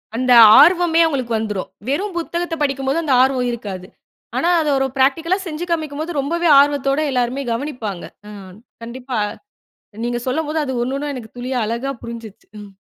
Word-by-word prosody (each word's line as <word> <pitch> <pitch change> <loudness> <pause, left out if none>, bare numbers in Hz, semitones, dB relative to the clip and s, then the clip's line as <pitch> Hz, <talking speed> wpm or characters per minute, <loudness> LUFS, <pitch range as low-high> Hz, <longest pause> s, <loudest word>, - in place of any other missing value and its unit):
அந்த 255 +2 0 0.3
ஆர்வமே 340 +2 +5
அவுங்களுக்கு 260 -7 -1
வந்துரும். 210 -3 -4 0.2
வெறும் 375 +9 -2
புத்தகத்த 340 0 -3
படிக்கும் 275 -2 -1
போது 310 +5 0
அந்த 290 -4 +1
ஆர்வம் 255 -1 +1
இருக்காது. 200 -6 -7 0.5
ஆனா 340 - +1
அத 305 - -1
ஒரு 270 - +1
பிராக்டிகல்லா 320 +7 +2
செஞ்சு 325 +1 -5
காமிக்கும்போது, 315 -1 -3
ரொம்பவே 340 +5 -1
ஆர்வத்தோட 280 0 +2
எல்லாருமே 250 +2 -1
கவனிப்பாங்க. 230 - -5 0.3
ஆ. - - -10 0.5
கண்டிப்பா 250 +1 -6 0.9
நீங்க 240 0 -2
சொல்லம்போது 305 +4 -2
அது 265 - -4
ஒண்ணு 255 +3 -2
ஒண்ணா 290 +1 -4
எனக்கு 230 -4 -10
துளியா 250 +1 -3
அழகா 235 +5 -3
புரிஞ்சுருச்சு. 230 -3 -10
ம். 205 -1 -11
270 Hz, 155 wpm, -19 LUFS, 240-310 Hz, 0.9 s, ஆர்வமே